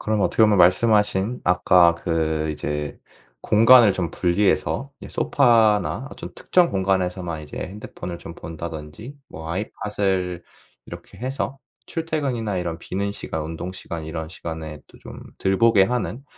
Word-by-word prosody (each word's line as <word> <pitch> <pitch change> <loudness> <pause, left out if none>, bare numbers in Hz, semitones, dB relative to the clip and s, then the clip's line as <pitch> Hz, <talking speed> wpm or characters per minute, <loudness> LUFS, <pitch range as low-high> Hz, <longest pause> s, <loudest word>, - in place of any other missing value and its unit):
그럼 110 -1 -1
어떻게 110 - +2
보면 105 -3 +3
말씀하신 105 +4 +3
아까 90 -1 +5
그 80 -2 -1
이제 75 -1 -4 0.4
공간을 115 - +6
좀 90 -3 -2
분리해서 100 +8 0
이제 - - -9
소파나 115 -3 +2
어떤 - - -9
특정 180 -2 +2
공간에서만 90 -4 -1
이제 75 - -11
핸드폰을 90 -3 -7
좀 85 - -10
본다든지 80 - -8
뭐 80 0 -9
아이팟을 95 -2 -2 0.4
이렇게 - - -11
해서 135 +2 -3 0.3
출퇴근이나 135 - -2
이런 85 -2 -3
비는 100 +3 -3
시간, 80 -5 -5
운동 80 +3 -6
시간, 85 -3 -7
이런 80 0 -5
시간에 80 -2 -7
또 - - -19
좀 - - -11 0.2
덜 95 0 0
보게 115 -4 +5
하는 125 +4 -3
95 Hz, 315 characters per minute, -23 LUFS, 85-110 Hz, 0.4 s, 공간을